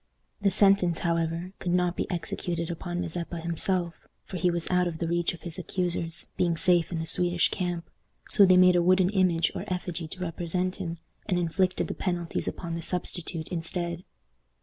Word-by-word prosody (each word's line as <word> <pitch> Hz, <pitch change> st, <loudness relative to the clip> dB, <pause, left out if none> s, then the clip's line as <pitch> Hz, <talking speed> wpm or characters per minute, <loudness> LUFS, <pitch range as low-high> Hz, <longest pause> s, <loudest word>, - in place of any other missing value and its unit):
The 200 Hz, -, +3 dB
sentence, 195 Hz, -4 st, +4 dB
however, 170 Hz, +2 st, -1 dB
could 175 Hz, -, -2 dB
not 180 Hz, -1 st, +1 dB
be -, -, -3 dB
executed 170 Hz, -1 st, -3 dB
upon 175 Hz, +1 st, -4 dB
Mazeppa 170 Hz, 0 st, -4 dB
himself, 170 Hz, +1 st, -1 dB, 0.3 s
for 185 Hz, -, -6 dB
he 180 Hz, +1 st, +2 dB
was 170 Hz, -1 st, -2 dB
out 180 Hz, 0 st, +2 dB
of 165 Hz, -2 st, -4 dB
the 170 Hz, -, -3 dB
reach 170 Hz, 0 st, 0 dB
of 165 Hz, -, -18 dB
his 170 Hz, +1 st, -5 dB
accusers, 175 Hz, -2 st, +3 dB
being 170 Hz, -2 st, +1 dB
safe 175 Hz, 0 st, +4 dB
in 170 Hz, -, -2 dB
the 160 Hz, -, -3 dB
Swedish 175 Hz, +1 st, +3 dB
camp. 175 Hz, -2 st, -3 dB, 0.4 s
So 205 Hz, -, +6 dB
they 185 Hz, -1 st, +6 dB
made 180 Hz, 0 st, +6 dB
a 175 Hz, -, +4 dB
wooden 185 Hz, +1 st, +3 dB
image 185 Hz, -4 st, +2 dB
or -, -, -5 dB
effigy 180 Hz, -2 st, -4 dB
to 185 Hz, -, -9 dB
represent 180 Hz, +1 st, -2 dB
him, 170 Hz, -4 st, -5 dB, 0.3 s
and 185 Hz, -4 st, +1 dB
inflicted 180 Hz, +2 st, 0 dB
the -, -, -4 dB
penalties 175 Hz, -3 st, -3 dB
upon 170 Hz, -2 st, -5 dB
the 165 Hz, -, -4 dB
substitute 170 Hz, -1 st, -3 dB
instead. 170 Hz, 0 st, -3 dB
175 Hz, 185 wpm, -27 LUFS, 170-180 Hz, 0.4 s, So